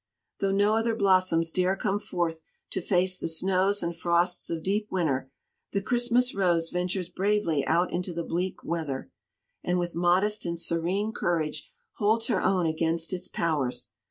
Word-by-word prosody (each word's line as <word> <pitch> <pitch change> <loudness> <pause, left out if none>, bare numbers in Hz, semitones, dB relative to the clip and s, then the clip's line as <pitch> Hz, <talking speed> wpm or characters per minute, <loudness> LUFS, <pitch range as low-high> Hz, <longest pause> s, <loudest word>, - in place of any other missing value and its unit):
Though 195 -1 +1
no 205 +2 +3
other 225 0 +1
blossoms 185 -5 +3
dare 185 +2 +1
come 200 0 -1
forth 175 -6 -2 0.3
to 190 - -2
face 185 +1 +2
the - - -2
snows 190 +4 +2
and 170 0 -2
frosts 175 +1 +1
of 165 -1 -3
deep 210 +2 0
winter, 145 -8 -1 0.4
the 200 - +1
Christmas 245 +1 +2
Rose 170 -4 +1
ventures 180 0 -1
bravely 195 -7 0
out 175 +3 +2
into 180 +1 -2
the 170 0 -3
bleak 180 +3 -3
weather, 155 -6 -3 0.5
and 180 0 0
with 175 -1 -2
modest 185 +5 +2
and 170 -1 -2
serene 175 +6 0
courage 155 -6 -2 0.3
holds 220 +3 +2
her 195 -6 +1
own 185 -3 +2
against 165 +2 0
its 180 0 -3
powers. 145 -7 -1
180 Hz, 160 wpm, -27 LUFS, 165-200 Hz, 0.5 s, no